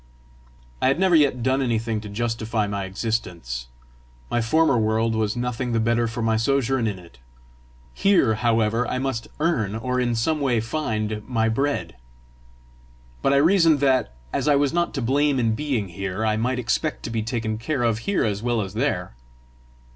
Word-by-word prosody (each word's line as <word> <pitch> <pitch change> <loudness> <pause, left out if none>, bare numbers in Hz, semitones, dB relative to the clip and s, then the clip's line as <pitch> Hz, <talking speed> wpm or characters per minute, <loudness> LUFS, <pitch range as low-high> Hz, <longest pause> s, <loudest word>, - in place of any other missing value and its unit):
I 130 - +3
had 135 +5 +2
never 190 -2 +4
yet 140 -6 +3
done 130 +2 +2
anything 115 -3 -1
to 105 - -8
justify 115 0 -1
my 100 -1 -3
existence; 90 - -3 0.6
my 120 - +1
former 155 +5 +3
world 110 0 +1
was 110 -1 0
nothing 125 0 -2
the 115 - +2
better 115 +1 +1
for 115 +1 -4
my 110 0 +2
sojourn 130 0 +1
in 105 -3 -3
it: 85 -9 -16 0.7
here, 185 - +3
however, 115 +1 +1
I 130 - -2
must 130 -3 -2
earn, 120 - 0
or 125 +3 -1
in 120 -2 0
some 150 +7 0
way 125 -5 +2
find, 110 -4 -2
my 115 -2 +1
bread! 140 - -1 1.2
But 135 - +2
I - - +4
reasoned 165 0 +4
that, 130 - +2 0.2
as 140 +1 -1
I 145 - +5
was 140 +1 +2
not 175 -1 0
to 135 - -2
blame 140 +3 +2
in 115 -2 +2
being 120 -6 -2
here, 95 +4 -3
I 110 -1 +2
might 125 +4 0
expect 125 +6 -1
to 115 - -5
be 115 -1 -1
taken 110 -1 -3
care 125 +2 -1
of 115 -2 +1
here 200 +6 0
as 105 -2 -1
well 120 -1 0
as 95 -2 -5
there! - - -1
115 Hz, 180 wpm, -23 LUFS, 110-135 Hz, 1.2 s, I